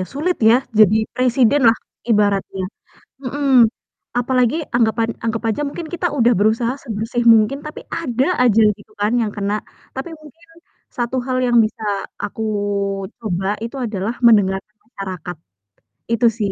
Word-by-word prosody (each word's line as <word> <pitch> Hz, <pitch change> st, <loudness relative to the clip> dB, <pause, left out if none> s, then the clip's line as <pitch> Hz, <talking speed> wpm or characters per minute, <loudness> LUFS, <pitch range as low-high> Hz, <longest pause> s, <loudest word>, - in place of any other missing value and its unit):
ya, -, -, -1 dB
sulit 320 Hz, +6 st, -1 dB
ya, 225 Hz, +1 st, +6 dB, 0.2 s
jadi 215 Hz, 0 st, +6 dB, 0.2 s
presiden 255 Hz, +2 st, +3 dB
lah 225 Hz, -, +4 dB, 0.3 s
ibaratnya, 200 Hz, -3 st, +1 dB, 0.6 s
mhm. 265 Hz, -2 st, +4 dB, 0.5 s
Apalagi 250 Hz, +3 st, +1 dB, 0.2 s
anggapan 225 Hz, -1 st, +2 dB, 0.2 s
anggap 225 Hz, 0 st, -1 dB
aja 220 Hz, -, -3 dB
mungkin 325 Hz, +3 st, -7 dB
kita 355 Hz, 0 st, -1 dB
udah 240 Hz, 0 st, +4 dB
berusaha 225 Hz, +4 st, +1 dB
sebersih 225 Hz, 0 st, -3 dB
mungkin, 220 Hz, +5 st, +2 dB
tapi 305 Hz, -, -7 dB
ada 260 Hz, -5 st, -1 dB, 0.2 s
aja 225 Hz, -3 st, +4 dB, 0.2 s
gitu 210 Hz, +1 st, -19 dB
kan 210 Hz, +2 st, +1 dB
yang 215 Hz, -, -1 dB
kena. 205 Hz, +1 st, -1 dB, 0.4 s
Tapi 265 Hz, +6 st, -5 dB
mungkin 325 Hz, +3 st, -17 dB, 0.5 s
satu 240 Hz, +1 st, -2 dB
hal 255 Hz, -1 st, -1 dB
yang 240 Hz, -1 st, +4 dB
bisa 215 Hz, +1 st, -5 dB, 0.4 s
aku 205 Hz, +2 st, -4 dB, 0.8 s
coba 190 Hz, -4 st, -2 dB, 0.2 s
itu 235 Hz, +4 st, -6 dB
adalah 210 Hz, +1 st, -3 dB
mendengarkan 205 Hz, -2 st, +3 dB
masyarakat. 185 Hz, -6 st, -7 dB, 0.8 s
Itu 230 Hz, +1 st, +3 dB
sih, 205 Hz, -3 st, -1 dB
230 Hz, 140 wpm, -19 LUFS, 210-255 Hz, 0.8 s, ya